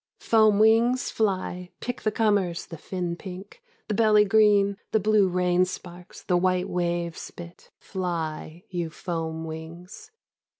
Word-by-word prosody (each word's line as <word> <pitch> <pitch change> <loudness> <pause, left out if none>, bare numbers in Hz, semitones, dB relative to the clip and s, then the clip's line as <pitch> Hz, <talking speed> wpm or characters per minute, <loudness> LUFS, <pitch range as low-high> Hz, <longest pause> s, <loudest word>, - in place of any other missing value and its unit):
Foam 215 -2 +4
wings, 225 +4 +3
fly; 185 -4 -1
pick 245 - -5
the 215 - 0
comers, 205 -6 +1
the 165 - -9
fin 175 -1 -4
pink, 190 - -10 0.3
the 215 - -1
belly 210 -1 +5
green, 205 -1 +4
the 220 - +3
blue 210 -1 +3
rain 180 0 +2
sparks, 180 -1 -8
the 180 -3 +2
white 185 0 +1
wave 175 -1 -2
spit 170 0 -11
— - - -64
fly, 170 -3 -4
you 175 -2 -2
foam 160 -1 -4
wings. 170 - -9
185 Hz, 140 wpm, -26 LUFS, 175-210 Hz, 0.3 s, belly